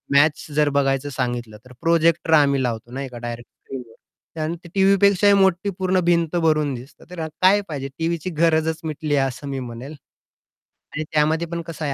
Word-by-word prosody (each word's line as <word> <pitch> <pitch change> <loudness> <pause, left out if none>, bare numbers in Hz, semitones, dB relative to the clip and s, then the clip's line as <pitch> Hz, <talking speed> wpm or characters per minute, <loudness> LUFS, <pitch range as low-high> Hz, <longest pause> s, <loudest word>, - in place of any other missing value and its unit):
Match 150 +2 +4
जर 150 -1 +3
बघायचं 135 0 +1
सांगितलं 120 -5 -3
तर 125 - -15
प्रोजेक्टर 165 0 +2
आम्ही 140 -3 +4
लावतो 120 -1 -3
ना, 135 +2 -5
एका 125 -3 -8
डायरेक्ट 120 0 -7
स्क्रीनवर. 125 +5 -12
आणि 160 +2 -2 0.2
टीव्हीपेक्षाही 200 +1 +4
मोठी 190 -1 +3
पूर्ण 185 0 +2
भिंत 170 -1 +2
भरून 155 -4 +2
दिसतं. 125 +4 -12
तर 175 -3 -5 0.2
काय 195 +3 +5
पाहिजे 140 -3 -4
टीव्हीची 165 +1 -1
गरजच 160 -1 +2
मिटली 155 -1 -2
आहे 135 -1 +2
असं 130 +2 -7
मी 135 -1 -3
म्हणेल. 125 +3 -7 1.0
आणि 155 - -2
त्यामध्ये 155 +2 +2
पण 170 0 -4
कसं 160 -2 -5
आहे, 140 - -1
155 Hz, 170 wpm, -22 LUFS, 135-170 Hz, 1.0 s, काय